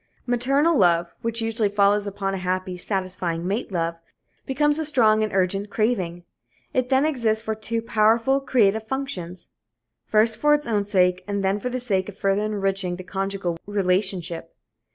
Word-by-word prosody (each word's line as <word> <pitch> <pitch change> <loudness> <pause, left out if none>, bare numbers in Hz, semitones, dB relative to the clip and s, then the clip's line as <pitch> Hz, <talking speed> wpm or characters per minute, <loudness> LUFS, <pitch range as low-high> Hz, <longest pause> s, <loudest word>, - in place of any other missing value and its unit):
Maternal 275 +7 +2
love, 170 -2 +3
which 230 0 -2
usually 225 -2 0
follows 205 0 +2
upon 195 -1 -3
a 195 - -3
happy, 185 0 -2
satisfying 180 -3 -3
mate 205 +3 -2
love, 165 -2 -1 0.5
becomes 295 +3 +1
a - - 0
strong 225 -7 +4
and 215 -1 -1
urgent 195 +2 0
craving. 190 -6 -1 0.5
It 255 -1 0
then 265 +2 +3
exists 230 -7 0
for 220 - -2
two 225 +1 -3
powerful, 230 +5 +3
creative 220 -6 +2
functions. 185 -10 -5 0.6
First, 220 +1 +3
for 295 0 +5
its 295 - -3
own 210 -3 0
sake, 185 -2 +2
and 200 -1 -2
then 195 +2 +1
for 250 - -3
the 255 +1 -3
sake 200 -6 0
of 195 - -11
further 195 +2 +1
enriching 195 -3 -1
the 185 - -8
conjugal 190 -2 -3
relationship. 185 -4 -1
205 Hz, 165 wpm, -23 LUFS, 185-230 Hz, 0.6 s, for